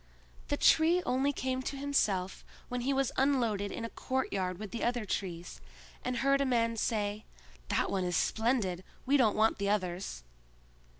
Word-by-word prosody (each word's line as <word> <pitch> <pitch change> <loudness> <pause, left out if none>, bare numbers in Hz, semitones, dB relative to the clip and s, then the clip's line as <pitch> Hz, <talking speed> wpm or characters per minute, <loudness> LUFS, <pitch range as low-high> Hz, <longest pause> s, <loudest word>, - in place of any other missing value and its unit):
The - - 0
Tree 335 +3 +4
only 265 +3 +2
came 260 -1 -2
to 275 +1 -4
himself 205 -10 0 0.3
when 250 0 -2
he 265 +3 0
was 270 -1 +1
unloaded 235 -7 +1
in 230 - -4
a - - -5
courtyard 195 -9 -2
with 210 0 -7
the 235 - -4
other 240 -2 0
trees, 175 -3 -4 0.4
and 250 0 -2
heard 275 0 +4
a - - +4
man 230 -3 +1
say, 210 -1 -1 0.4
"That - - 0
one 190 -1 0
is 175 -2 0
splendid! 220 -6 0 0.2
we 275 +2 +3
don't 240 -7 +4
want 220 0 +3
the 200 0 0
others." 180 - -2
230 Hz, 170 wpm, -31 LUFS, 200-265 Hz, 0.4 s, Tree